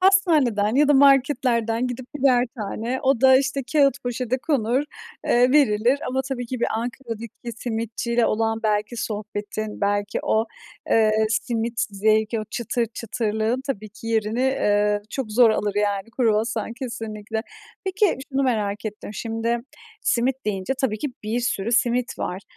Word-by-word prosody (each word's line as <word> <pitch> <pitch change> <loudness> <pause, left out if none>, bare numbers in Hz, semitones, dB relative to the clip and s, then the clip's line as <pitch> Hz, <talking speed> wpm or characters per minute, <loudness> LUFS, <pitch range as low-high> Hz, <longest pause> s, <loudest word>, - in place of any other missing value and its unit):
Hastaneden 300 - +3
ya 290 +2 +4
da 295 - +6
marketlerden 255 -4 +3
gidip 250 0 -5
birer 255 -3 +3
tane, 225 +5 -3
o 265 -3 +2
da 260 0 +7
işte 275 0 -1
kağıt 280 -4 +3
poşete 245 +1 -2
konur, 265 -3 +1 0.4
eee, 245 +1 +4
verilir 250 -2 +4
ama 265 +1 0
tabii 245 -2 -3
ki 250 0 -5
bir - - +2
Ankara'daki 235 0 -5
simitçiyle 230 +1 -1
olan 225 +1 0
belki 210 +1 0
sohbetin, 210 -1 -4
belki 205 0 0
o, 220 +1 +1 0.4
eee, 220 -1 +4 0.2
simit 230 0 -1
zevki, 215 +2 +1
o - - -5
çıtır 235 +1 -1
çıtırlığın 225 +1 -2
tabii 215 -6 -3
ki 220 +2 -12
yerini, 225 +1 0
eee, 210 -5 +2
çok 250 -6 -4
zor 235 0 +6
alır 205 -2 -1
yani 205 +1 0
kruvasan 225 -1 +1
kesinlikle. 225 -3 -5 0.4
Peki 390 +1 +2
şunu 275 0 +1
merak 210 -5 -1
ettim. 210 -1 -6
Şimdi 230 +2 -1 0.4
simit 250 +2 +1
deyince 195 +4 -1
tabii 220 -5 0
ki 295 - -2 0.2
bir 220 +3 -1
sürü 230 -2 -1
simit 245 +1 +1
var. 185 +2 -4
230 Hz, 145 wpm, -23 LUFS, 215-255 Hz, 0.4 s, da